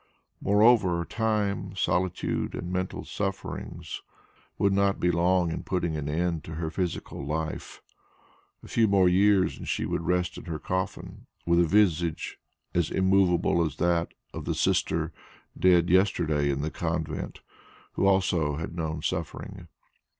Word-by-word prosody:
Moreover 100 Hz, -4 st, +4 dB
time, 105 Hz, -4 st, -1 dB
solitude 90 Hz, -1 st, -1 dB
and 90 Hz, -, -5 dB
mental 95 Hz, 0 st, -3 dB
sufferings 100 Hz, -1 st, -5 dB, 0.6 s
would 100 Hz, -1 st, +2 dB
not 100 Hz, 0 st, +2 dB
be 90 Hz, -, +2 dB
long 90 Hz, 0 st, +2 dB
in -, -, -3 dB
putting 85 Hz, -4 st, -1 dB
an 75 Hz, -1 st, -3 dB
end 85 Hz, 0 st, -1 dB
to 80 Hz, -, -7 dB
her 80 Hz, 0 st, -3 dB
physical 90 Hz, -5 st, -3 dB
life. 80 Hz, +2 st, -4 dB, 0.8 s
A -, -, -11 dB
few 115 Hz, -1 st, +3 dB
more 95 Hz, -2 st, +4 dB
years, 95 Hz, +1 st, +3 dB
and -, -, -6 dB
she -, -, 0 dB
would -, -, -1 dB
rest 90 Hz, 0 st, 0 dB
in -, -, -12 dB
her 80 Hz, -2 st, -4 dB
coffin 95 Hz, +5 st, -4 dB, 0.2 s
with 85 Hz, 0 st, +3 dB
a 85 Hz, -, +5 dB
visage 85 Hz, -3 st, +1 dB, 0.3 s
as 85 Hz, -3 st, +1 dB
immovable 95 Hz, -3 st, +3 dB
as 80 Hz, -3 st, -2 dB
that 85 Hz, -1 st, 0 dB, 0.2 s
of -, -, -6 dB
the -, -, -1 dB
Sister 80 Hz, 0 st, +1 dB, 0.4 s
dead 90 Hz, -2 st, +4 dB
yesterday 85 Hz, -6 st, +2 dB
in 70 Hz, 0 st, -1 dB
the 80 Hz, +2 st, -2 dB
convent, 80 Hz, -1 st, -3 dB, 0.5 s
who 95 Hz, -, +1 dB
also 90 Hz, -6 st, +2 dB
had 80 Hz, +2 st, -5 dB
known 80 Hz, -2 st, -3 dB
suffering. 80 Hz, -4 st, -4 dB
90 Hz, 145 wpm, -27 LUFS, 80-95 Hz, 0.8 s, a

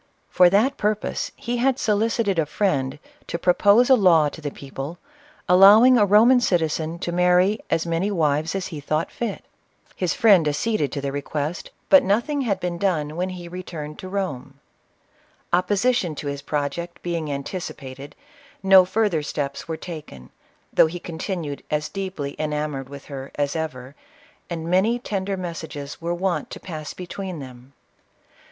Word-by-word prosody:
For 180 Hz, -1 st, +6 dB
that 230 Hz, +9 st, +2 dB
purpose, 210 Hz, 0 st, -1 dB
he 245 Hz, -3 st, -3 dB
had 260 Hz, +1 st, +2 dB
solicited 215 Hz, -4 st, +1 dB
a 155 Hz, -, +1 dB
friend 145 Hz, -7 st, 0 dB, 0.3 s
to -, -, -3 dB
propose'a 205 Hz, +9 st, +4 dB
law 175 Hz, -, +5 dB
to 160 Hz, -, -11 dB
the 145 Hz, -, -3 dB
people, 140 Hz, +4 st, -7 dB, 0.5 s
allowing 205 Hz, +8 st, +8 dB
a 210 Hz, -4 st, +4 dB
Roman 225 Hz, +6 st, +6 dB
citizen 165 Hz, -5 st, 0 dB
to 175 Hz, -, -4 dB
marry 180 Hz, +4 st, +3 dB
as 165 Hz, -, +1 dB
many 170 Hz, +4 st, 0 dB
wives 155 Hz, -3 st, 0 dB
as 190 Hz, -2 st, -2 dB
he 150 Hz, -, -5 dB
thought 155 Hz, +2 st, -2 dB
fit. 235 Hz, -4 st, -4 dB, 0.5 s
His 180 Hz, -2 st, -1 dB
friend 205 Hz, -, +5 dB
acceded 150 Hz, +1 st, 0 dB
to 140 Hz, -, -3 dB
the 140 Hz, 0 st, -2 dB
re 145 Hz, -, -2 dB
I'LK.Ol'ATRA. -, -, -20 dB, 0.2 s
quest, -, -, -10 dB, 0.2 s
but 285 Hz, -, +8 dB
nothing 240 Hz, +9 st, 0 dB
had 205 Hz, -7 st, 0 dB
been 175 Hz, -2 st, -3 dB
done 155 Hz, -6 st, 0 dB
when 180 Hz, +2 st, -1 dB
he 180 Hz, -2 st, -8 dB
returned 165 Hz, -4 st, -7 dB
to 185 Hz, -, -7 dB
Rome. 145 Hz, -9 st, -4 dB, 0.9 s
Opposition 190 Hz, 0 st, +1 dB
to 145 Hz, -, -7 dB
his 140 Hz, 0 st, -4 dB
project 150 Hz, +4 st, -4 dB
being 165 Hz, -4 st, -2 dB
anticipated, 140 Hz, -2 st, -6 dB, 0.5 s
no 190 Hz, -1 st, +7 dB
further 200 Hz, -4 st, +1 dB
steps 145 Hz, 0 st, -4 dB
were 160 Hz, -1 st, -3 dB
taken, 150 Hz, -, -9 dB, 0.4 s
though -, -, +6 dB
he 175 Hz, +2 st, -6 dB
continued 165 Hz, -3 st, -5 dB
as 150 Hz, 0 st, -1 dB
deep 195 Hz, -1 st, -5 dB
ly 140 Hz, 0 st, -4 dB
enamored 150 Hz, -3 st, -3 dB
with 140 Hz, 0 st, -10 dB
her 135 Hz, -2 st, -8 dB
as 145 Hz, 0 st, -1 dB
ever, 140 Hz, -5 st, -5 dB, 0.6 s
and 165 Hz, -2 st, -4 dB
many 190 Hz, +7 st, +2 dB
tender 195 Hz, -4 st, -3 dB
mes 175 Hz, -3 st, -5 dB
sages 145 Hz, -2 st, -8 dB
were 170 Hz, +1 st, -2 dB
wont 175 Hz, -4 st, -1 dB
to -, -, -8 dB
pass 155 Hz, -4 st, -7 dB
between 185 Hz, 0 st, -6 dB
them. 130 Hz, -1 st, -11 dB
175 Hz, 165 wpm, -23 LUFS, 150-195 Hz, 0.9 s, allowing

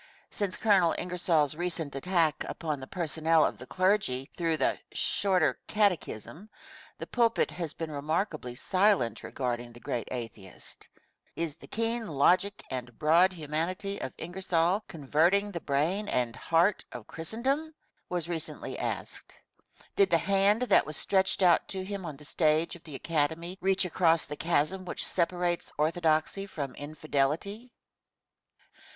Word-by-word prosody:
Since 200 Hz, -3 st, -2 dB
Colonel 195 Hz, -6 st, +4 dB
Ingersoll's 170 Hz, -4 st, +1 dB
recent 165 Hz, -3 st, -3 dB
attack 165 Hz, +1 st, +1 dB
upon 155 Hz, -4 st, -3 dB
the 130 Hz, -, -8 dB
personnel 160 Hz, -2 st, +2 dB
of -, -, -3 dB
the 130 Hz, -, -9 dB
clergy 185 Hz, -9 st, +1 dB
through 165 Hz, -2 st, 0 dB
the 135 Hz, -, +1 dB
"Shorter 185 Hz, -5 st, +1 dB
Catechism" 200 Hz, -, -1 dB, 0.5 s
the -, -, -6 dB
pulpit 235 Hz, -2 st, +2 dB
has 170 Hz, -4 st, -5 dB
been 165 Hz, -2 st, -5 dB
remarkably 150 Hz, -, -2 dB
silent 185 Hz, -, +2 dB
regarding 120 Hz, -2 st, -3 dB
the 120 Hz, -, -13 dB
great 120 Hz, -2 st, -3 dB
atheist. 115 Hz, -6 st, -8 dB, 0.5 s
"Is 165 Hz, -3 st, -2 dB
the -, -, -14 dB
keen 230 Hz, 0 st, -1 dB
logic 180 Hz, +7 st, +2 dB
and 125 Hz, -3 st, -5 dB
broad 170 Hz, +5 st, +5 dB
humanity 175 Hz, +4 st, -2 dB
of 130 Hz, -, -3 dB
Ingersoll 180 Hz, +2 st, 0 dB
converting 170 Hz, +7 st, +2 dB
the 170 Hz, -3 st, -5 dB
brain 165 Hz, +9 st, 0 dB
and 120 Hz, -, 0 dB
heart 170 Hz, +8 st, +2 dB
of 110 Hz, -, -8 dB
Christendom?" 260 Hz, -, -2 dB, 0.4 s
was 175 Hz, -2 st, -2 dB
recently 165 Hz, -1 st, -5 dB
asked. -, -, -4 dB, 0.6 s
Did 400 Hz, -1 st, +4 dB
the -, -, +5 dB
hand 200 Hz, +4 st, +3 dB
that 210 Hz, -, +4 dB
was 155 Hz, -2 st, -2 dB
stretched 190 Hz, 0 st, +2 dB
out 175 Hz, -2 st, +5 dB
to 190 Hz, -1 st, -4 dB
him 195 Hz, -2 st, -5 dB
on 150 Hz, -3 st, -7 dB
the 150 Hz, -, -13 dB
stage 155 Hz, +2 st, +1 dB
of 170 Hz, -, -15 dB
the 150 Hz, -4 st, -8 dB
Academy 160 Hz, +4 st, -1 dB
reach 190 Hz, 0 st, +2 dB
across 165 Hz, -2 st, +3 dB
the 150 Hz, -, -6 dB
chasm 170 Hz, +4 st, 0 dB
which 180 Hz, -, -1 dB
separates 175 Hz, 0 st, 0 dB
orthodoxy 160 Hz, +4 st, +1 dB
from 140 Hz, -8 st, -5 dB
infidelity? 155 Hz, -, -2 dB
170 Hz, 140 wpm, -29 LUFS, 150-190 Hz, 0.6 s, broad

